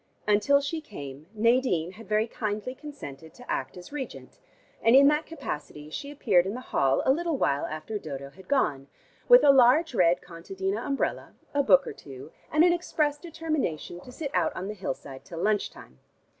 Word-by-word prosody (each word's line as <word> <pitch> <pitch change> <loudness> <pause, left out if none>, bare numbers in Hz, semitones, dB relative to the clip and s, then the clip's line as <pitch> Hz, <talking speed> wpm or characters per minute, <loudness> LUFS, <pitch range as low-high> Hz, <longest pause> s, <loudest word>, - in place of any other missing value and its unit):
Until 210 +8 +4
she 315 +3 -3
came 145 - -9
Nadine 230 -6 +2
had 225 +3 -14
very 215 +1 +2
kindly 215 +1 -4
consented 165 - -10
to 245 - -14
act 130 +6 -3
as 180 - -11
regent, 290 - -7 0.4
and 230 +2 +5
in 280 +1 +8
that 300 +1 0
capacity 150 - -7
she 280 - -5
appeared 205 -11 +2
in 200 - -3
the - - -5
hall 135 - +1
a - - +5
little 330 +1 0
while 140 - +1
after 155 +8 -5
Dodo 140 -5 -7
had 190 +4 -16
gone, 150 - +1 0.4
with - - +9
a 285 - +8
large 270 +4 +5
red 175 -5 +4
contadina 190 +4 -4
umbrella, 275 -1 -2 0.2
a 285 - +3
book 275 0 +5
or - - -5
two, 135 +2 -11 0.2
and 305 +1 +5
an 350 0 +5
expressed 300 -4 -1
determination 310 - -3
to 250 - -12
sit 280 +2 -5
out - - +1
on 185 - -4
the - - -3
hillside 135 -8 -6
till 170 - -10
lunch 205 +3 +1
time. 65 - -15
215 Hz, 185 wpm, -27 LUFS, -, 0.4 s, with